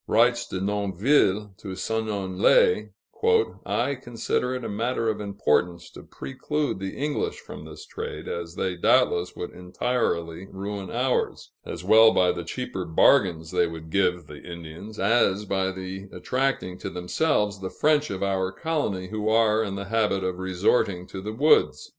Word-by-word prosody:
Writes 120 +2 +3
De 95 - -4
Nonville 100 +1 +1
to 95 -2 -6
Seignelay, 110 - +2 0.8
"I 140 - 0
consider 125 0 -2
it 125 - -5
a - - -3
matter 115 +2 -1
of 110 - -2
importance 90 -4 0
to - - -11
preclude 145 -3 -3
the 95 0 -5
English 145 +1 -1
from - - -10
this - - -10
trade, - - -6
as 85 0 -5
they 90 0 -1
doubtless 85 0 +2
would 90 - -5
entirely 90 -3 -2
ruin 100 0 -6
ours 125 +2 -1
as - - -7
well 110 0 +7
by 90 -1 +4
the - - -5
cheaper - - -4
bargains 80 - +3
they 85 - +2
would 80 -1 -9
give 90 -2 +1
the 75 -1 -11
Indians, 85 +5 -9
as 105 -1 +2
by 95 -1 0 0.5
attracting 110 -3 -2
to - - -4
themselves 105 - 0
the 95 - -3
French 150 +4 +2
of 95 0 -3
our 95 -1 0
colony 110 - -2
who 110 0 -2
are 110 0 +3
in 100 -3 -4
the 100 0 -5
habit 105 -2 +1
of 90 -1 -2
resorting 95 0 +1
to 95 +1 -8
the 105 +2 -4
woods." 140 +8 +3
100 Hz, 155 wpm, -25 LUFS, 90-115 Hz, 0.8 s, well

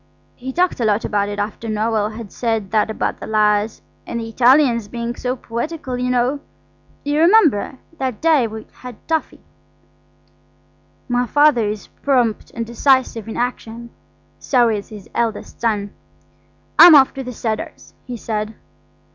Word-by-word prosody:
He 260 +1 -6
talked 355 +2 0
a - - 0
lot 210 0 +1
about 205 -1 0
it 205 - -5
after 210 +2 -4
Noël 215 0 -1
had 225 -4 -8
said 225 -5 -2
that 215 0 +2
about 220 - -2
the - - -7
lyres–and 215 +2 -1
the 225 0 -5
Italians 245 -1 +3
being 235 +2 -4
so 250 0 -2
poetical, 260 +3 -5
you 250 0 -2
know. 250 +3 +1 0.6
You 290 +1 0
remember 325 - +4 0.2
that 260 -4 -2
day 315 -7 +3
we 220 0 -8
had 250 -2 -9
toffee." 320 -1 -2 1.6
My 245 -1 0
Father 290 -5 +4
is 210 0 -4 0.2
prompt 245 -6 +1
and 230 -1 -3
decisive 235 -2 +1
in 225 - -6
action, 235 -1 -4 0.5
so 245 -3 +2
is 210 -2 -3
his 210 -3 -11
eldest 230 -3 -3
son. 210 -3 -1 0.9
"I'm 340 -2 +11
off 270 -2 +6
to 270 - -5
the 250 - -6
Cedars," 220 -2 -5
he 245 -1 -5
said. 215 0 -4
235 Hz, 150 wpm, -19 LUFS, 215-260 Hz, 1.6 s, I'm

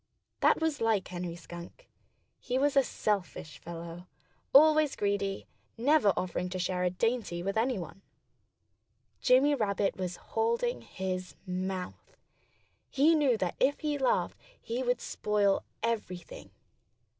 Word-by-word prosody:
That - - +4
was 320 -5 -1
like 220 -4 +2
Henry 175 -1 -4
Skunk. 175 - -11 0.5
He 250 0 -2
was 280 +1 +2
a 275 - +7
selfish 200 - -3
fellow 170 +1 -8 0.4
always 310 0 +6
greedy, 200 -1 -1 0.3
never 260 -3 +4
offering 180 0 -2
to 185 - -4
share 180 0 -1
a 180 - +3
dainty 210 -2 -1
with 195 +1 -2
anyone. 220 -6 -1 1.2
Jimmy 265 +4 +5
Rabbit 205 -6 0
was 180 -1 -3 0.2
holding 470 +2 0
his 185 -1 -5
mouth. 185 0 -5 0.7
He 295 +5 +4
knew 285 -7 +3
that 180 -4 -2
if 275 +2 +2
he 300 -2 -1
laughed 265 - +1 0.2
he 235 +3 -3
would 245 -1 0
spoil 205 -2 +1 0.2
everything. 205 -6 -4
205 Hz, 125 wpm, -30 LUFS, 180-270 Hz, 1.2 s, a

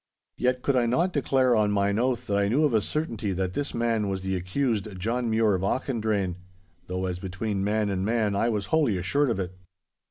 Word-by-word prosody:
Yet 125 0 0
could 140 - +2
I 120 -2 +3
not 170 +10 +1
declare 130 -3 +2
on 105 -1 +3
mine 100 +1 +1
oath 125 0 0
that 100 -2 0
I 100 - +2
knew 130 +9 +2
of 145 -5 +2
a 110 - +4
certainty 115 -7 -2
that 95 0 -2
this 145 +5 -3
man 115 -3 0
was 95 -1 -3
the 95 0 -1
accused 100 +1 -1
John 115 +5 -1
Mure 110 -1 +3
of 95 - 0
Auchendrayne. 105 -5 -1 0.5
Though 90 +1 -2
as 90 -1 -3
between 95 +2 -3
man 105 +1 +1
and 95 -1 -1
man 110 -1 +1
I 115 +4 +2
was 105 -3 -1
wholly 145 -11 +3
assured 140 +11 +1
of 115 - -1
it. 90 -1 -3
110 Hz, 215 wpm, -26 LUFS, 95-125 Hz, 0.5 s, a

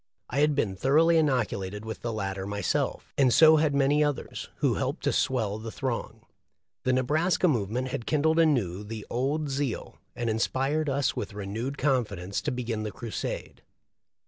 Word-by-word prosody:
I 140 - 0
had 150 0 +3
been 100 -9 0
thoroughly 160 - +4
inoculated 105 -8 -1
with 110 0 -6
the 120 - -2
latter 95 -3 -3
myself, 100 -1 -2
and 130 -3 +5
so 160 +4 +7
had 150 -2 +2
many 140 +2 +3
others, 145 -2 -3
who - - +1
helped - - -2
to - - +1
swell 110 -5 0
the 115 +1 -6
throng. 130 -1 -4 0.6
The 130 - +3
Nebraska 155 +9 +2
move 115 - +1
ment 125 +4 -2
had 120 -2 -4
kindled 160 +2 +2
anew 115 - +2
the 105 0 -7
old 140 +5 0
zeal, 135 -3 -3 0.2
and 120 - -2
inspired 135 +7 0
us 140 0 0
with 100 - -5
renewed 110 +7 -4
confidence 105 -9 0
to - - -2
begin 120 -3 -3
the 105 -1 -3
crusade. 115 +1 -5
125 Hz, 170 wpm, -27 LUFS, 110-145 Hz, 0.6 s, so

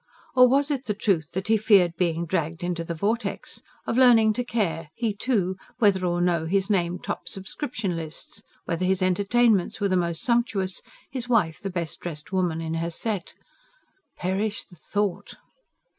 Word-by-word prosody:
Or 250 0 +8
was 280 +3 +2
it 270 -2 -2
the 210 - -1
truth 185 -7 +1
that 190 +2 -3
he 220 0 +4
feared 195 -5 +4
being 170 -1 0
dragged 165 -1 -2
into 175 -1 -2
the 170 0 -4
vortex?... 220 +8 -2 0.2
of 235 - 0
learning 225 -4 +6
to 245 - -1
care, 170 -10 -2
he, 230 -3 -1
too, 200 -4 0 0.2
whether 200 -4 +3
or 175 0 0
no 170 -2 +1
his 195 +3 +1
name 175 -2 +1
topped - - -5
subscription 195 - -4
lists; 165 - -7 0.2
whether 170 +1 -2
his 190 0 +2
entertainments 205 +2 +2
were 200 -1 +1
the 185 - +2
most 170 -2 0
sumptuous, 230 -6 0 0.3
his 250 -2 -4
wife 190 -10 +2
the 195 - -4
best 175 -3 -3
dressed 155 -2 -7
woman 175 -4 0
in 160 0 -3
her 165 +1 -1
set? 195 +2 -4 0.8
Perish 200 +4 -1
the 180 - -17
thought! 205 +3 -2
190 Hz, 175 wpm, -25 LUFS, 170-220 Hz, 0.8 s, Or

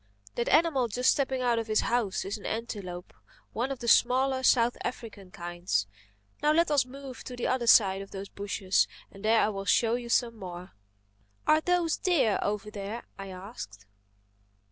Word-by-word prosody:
That 235 - -1
animal 305 -6 +3
just 250 +3 +2
stepping 265 -2 0
out 240 -2 +2
of 225 - -4
his 215 0 +2
house 230 -5 0
is 195 - -3
an 210 - -10
antelope, 200 -6 -5 0.4
one 245 +4 -1
of 270 - -3
the 235 - -4
smaller 260 +3 +4
South 245 -2 +4
African 215 -6 -6
kinds. 175 - -2 0.6
Now 300 - +3
let 335 0 +3
us 280 -4 +3
move 270 -1 -9
to 250 - -7
the 245 - -4
other 250 -2 0
side 195 -4 +6
of 195 - -9
those 195 0 -7
bushes 200 -2 0 0.2
there - - -14
and 215 - -2
I 220 -1 +4
will 195 -2 -5
show 225 +2 +3
you 240 0 -3
some 230 0 +1
more." 180 -1 -8 0.7
"Are 310 0 +4
those 350 -1 +1
deer 270 - +2
over 210 0 -2
there?" 210 +3 -6 0.2
I 195 - -6
asked. 185 - -9
230 Hz, 180 wpm, -28 LUFS, 195-255 Hz, 0.7 s, side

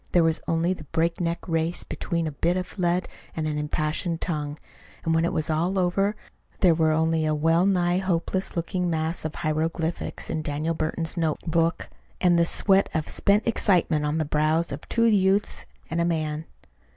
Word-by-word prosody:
There 175 - +5
was 160 -1 +1
only 165 +2 +1
the 155 - -10
breakneck 170 +3 -1
race 165 0 0
between 170 -1 -3
a 155 - -2
bit 170 +5 0
of 185 +2 -6
lead 175 0 +1 0.3
and 155 -1 -2
an 150 -1 -2
impassioned 155 +3 -2
tongue; 150 -4 -3 0.5
and 165 - +2
when 165 +1 +2
it - - 0
was 155 - -1
all 170 +5 0
over, 195 +3 +1 0.5
there 180 -4 +6
were 160 -1 +2
only 160 +1 +2
a 155 0 +1
well 165 +4 +3
nigh 180 -2 +2
hopeless 185 0 -1
looking 180 +1 -1
mass 160 0 -1
of 155 - -4
hieroglyphics 160 +1 -2
in 155 - -2
Daniel 155 +2 -2
Burton's 160 +1 -2
notebook 165 +1 0 0.3
and 175 -2 +4
the 170 - +4
sweat 195 +3 +3
of 160 -1 -1
spent 205 +1 +2
excitement 175 -8 +2
on 150 +1 0
the 160 - 0
brows 155 +3 +1
of - - -7
two 230 0 +2
youths 200 -2 +2 0.2
and 165 +1 -1
a - - +2
man. 155 -2 -1
165 Hz, 180 wpm, -25 LUFS, 155-180 Hz, 0.5 s, there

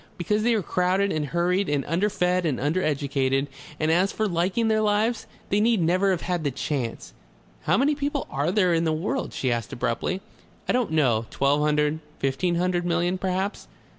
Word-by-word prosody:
Because 210 +4 0
they 235 +1 +2
are 210 - 0
crowded 185 +4 +1
and 150 -2 -1
hurried 175 +5 0
and 145 -2 0
underfed 180 +1 +1
and 150 -7 0
undereducated. 140 -3 0 0.3
And 155 +1 +1
as 185 +4 +3
for 220 - -1
liking 185 +5 0
their 220 -1 +2
lives, 215 +2 +1 0.2
they 200 - +2
need 225 0 +3
never 180 +4 +2
have 185 -3 0
had 175 -2 -2
the 145 - +1
chance." 130 -3 -4 0.5
"How - - +3
many 280 +4 +3
people 285 -1 -2
are 145 +4 0
there 185 -3 +3
in 165 0 +2
the 160 - +1
world?" 185 - -2
she 130 - -1
asked 115 -4 -3
abruptly. 150 +11 -2 0.5
"I - - +2
don't 250 -3 +1
know. 120 -8 +2
Twelve 140 +2 +1
hundred, 150 +1 +1 0.2
fifteen 135 +6 0
hundred 175 0 0
millions 175 +1 0
perhaps." 190 +2 -2
175 Hz, 185 wpm, -25 LUFS, 150-200 Hz, 0.5 s, as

